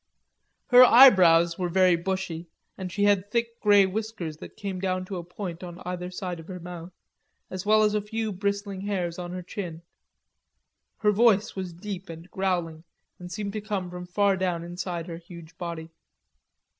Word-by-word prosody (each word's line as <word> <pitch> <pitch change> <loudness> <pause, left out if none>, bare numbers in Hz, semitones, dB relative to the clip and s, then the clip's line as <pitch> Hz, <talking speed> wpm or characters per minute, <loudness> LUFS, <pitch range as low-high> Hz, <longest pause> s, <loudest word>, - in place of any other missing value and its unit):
Her 250 0 +9
eyebrows 180 -10 +7
were 180 -1 -1
very 185 0 +4
bushy, 175 -1 -4 0.3
and 185 -2 -6
she 205 +3 -1
had 205 -1 +3
thick 235 +1 -2
grey 205 -2 +6
whiskers 190 -5 -4
that - - -12
came 195 -2 -4
down 185 0 -1
to 190 0 -5
a 175 - -5
point 175 0 -7
on 175 -1 -8
either 180 0 -4
side 180 -2 -5
of 165 - -12
her 185 -1 -7
mouth, 175 0 -8 0.6
as 185 +1 -5
well 215 0 +5
as 210 0 +2
a 210 - +1
few 220 +1 -3
bristling 200 0 -3
hairs 185 -4 -2
on 175 -1 -5
her 180 0 -5
chin. 170 -3 -6 1.1
Her 210 -1 +3
voice 215 -1 +3
was 185 -2 -4
deep 190 +1 -7
and 165 +2 -10
growling, 175 -4 -2 0.4
and 180 0 -9
seemed 200 0 -4
to 215 - -3
come 200 -4 -3
from 180 0 -7
far 200 +2 +2
down 180 -3 -1
inside 175 -1 -5
her 170 -2 -7
huge 170 -1 -13
body. 165 -2 -6
185 Hz, 180 wpm, -26 LUFS, 175-205 Hz, 1.1 s, Her